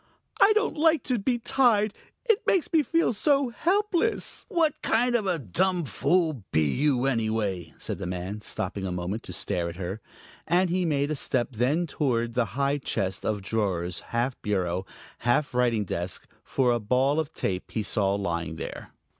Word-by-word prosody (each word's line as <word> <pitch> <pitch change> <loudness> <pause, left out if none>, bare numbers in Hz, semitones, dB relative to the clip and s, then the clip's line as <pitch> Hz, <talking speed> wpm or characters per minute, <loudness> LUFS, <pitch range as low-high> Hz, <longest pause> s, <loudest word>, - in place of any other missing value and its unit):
I 420 - +8
don't 430 -6 0
like 320 +1 +3
to 250 -3 0
be 240 +4 +1
tied; 230 -4 +3 0.3
it 450 -4 +4
makes 360 -2 +2
me 320 - +6
feel 330 -3 +1
so 275 +3 +2
helpless." 395 - 0
"What 330 -7 +1
kind 240 +2 +2
of 220 -5 +1
a 180 -2 +1
dumb 170 - 0
fool 160 -3 +1
be 80 - +3
you, 135 -2 +2
anyway?" 110 -9 -1
said - - -5
the 95 - -4
man, 90 +4 -4
stopping 95 -2 -3
a - - -3
moment 90 +5 -3
to - - -4
stare 85 -1 -2
at 85 - -8
her. 95 +4 -5 0.5
And 180 +1 +3
he 180 0 +1
made 145 -2 +1
a - - 0
step 130 -3 0
then 130 +9 +1
toward 120 -7 -1
the 125 -1 +2
high 140 +1 +1
chest 95 -7 -2
of 105 -2 -1
drawers, 95 -5 -1
half 120 +2 -1
bureau, 95 -2 -1 0.3
half 125 +4 +1
writing 120 -4 +2
desk, 90 +1 -4 0.2
for 130 -2 +1
a 120 - +1
ball 130 +7 +2
of 160 -1 -2
tape 95 -1 -3
he 110 - -2
saw 100 -2 +1
lying 85 -4 -2
there. - - -7
125 Hz, 180 wpm, -27 LUFS, -, 0.5 s, I